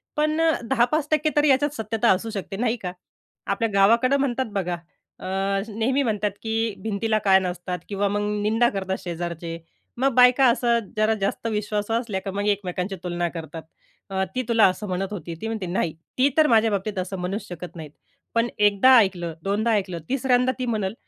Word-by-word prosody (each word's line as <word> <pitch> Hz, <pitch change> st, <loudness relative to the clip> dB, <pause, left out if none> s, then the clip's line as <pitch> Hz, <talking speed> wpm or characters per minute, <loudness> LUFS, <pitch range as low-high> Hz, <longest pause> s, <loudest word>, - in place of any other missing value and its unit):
पण 305 Hz, +1 st, +1 dB
अ, 325 Hz, 0 st, +4 dB, 0.2 s
10-5% 300 Hz, +4 st, +2 dB
तर 295 Hz, -, +4 dB
याच्यात 290 Hz, +1 st, +3 dB
सत्यता 220 Hz, 0 st, 0 dB
असू 190 Hz, +4 st, 0 dB
शकते, 195 Hz, -2 st, -5 dB
नाही 235 Hz, +1 st, 0 dB
का. 185 Hz, -6 st, -5 dB, 0.6 s
आपल्या 210 Hz, +3 st, 0 dB
गावाकडं 230 Hz, +7 st, +4 dB
म्हणतात 260 Hz, -1 st, 0 dB
बघा, 180 Hz, -3 st, -1 dB, 0.4 s
अ, -, -, -9 dB, 0.5 s
नेहमी 260 Hz, +5 st, +1 dB
म्हणतात, 210 Hz, -3 st, 0 dB
की 225 Hz, 0 st, -1 dB
भिंतीला 220 Hz, +1 st, 0 dB
कान 190 Hz, -1 st, +5 dB
असतात 180 Hz, 0 st, -4 dB
किंवा 200 Hz, 0 st, 0 dB
मग 205 Hz, +1 st, -1 dB, 0.2 s
निंदा 225 Hz, +3 st, +3 dB
करतात 190 Hz, -2 st, -3 dB
शेजारचे, 170 Hz, -1 st, -5 dB, 0.4 s
मग 270 Hz, +1 st, +2 dB
बायका 250 Hz, +1 st, +6 dB
असं 235 Hz, 0 st, +2 dB, 0.2 s
जरा 215 Hz, +1 st, +3 dB
जास्त 200 Hz, +3 st, -1 dB
विश्वासू 210 Hz, 0 st, -2 dB
असल्या, 230 Hz, -4 st, -1 dB
तर 195 Hz, -, -2 dB
मग 200 Hz, +2 st, -2 dB
एकमेकांची 195 Hz, -1 st, -1 dB
तुलना 175 Hz, -1 st, -1 dB
करतात, 165 Hz, -1 st, -8 dB, 0.7 s
"ती 255 Hz, -, +1 dB
तुला 230 Hz, -2 st, +5 dB
असं 195 Hz, +3 st, -5 dB
म्हणत 185 Hz, +1 st, -2 dB
होती," 170 Hz, -4 st, -6 dB
ती 220 Hz, -, -3 dB
म्हणते, 220 Hz, -4 st, -3 dB
"नाही, 175 Hz, -2 st, -1 dB, 0.2 s
ती 260 Hz, +2 st, +5 dB
तर 310 Hz, -1 st, +6 dB
माझ्या 225 Hz, -3 st, +4 dB
बाबतीत 200 Hz, +1 st, -2 dB
असं 185 Hz, +1 st, -4 dB
म्हणू 180 Hz, +3 st, -2 dB
शकत 175 Hz, 0 st, -9 dB
नाहीत," 155 Hz, -3 st, -8 dB, 0.4 s
पण 230 Hz, +1 st, +3 dB
एकदा 210 Hz, +5 st, +5 dB
ऐकलं, 180 Hz, -6 st, +1 dB
दोनदा 210 Hz, +4 st, 0 dB
ऐकलं, 185 Hz, -4 st, -2 dB
तिसऱ्यांदा 255 Hz, -1 st, +2 dB
ती 255 Hz, -, -1 dB
म्हणल 215 Hz, -5 st, -1 dB
210 Hz, 175 wpm, -24 LUFS, 190-240 Hz, 0.7 s, बायका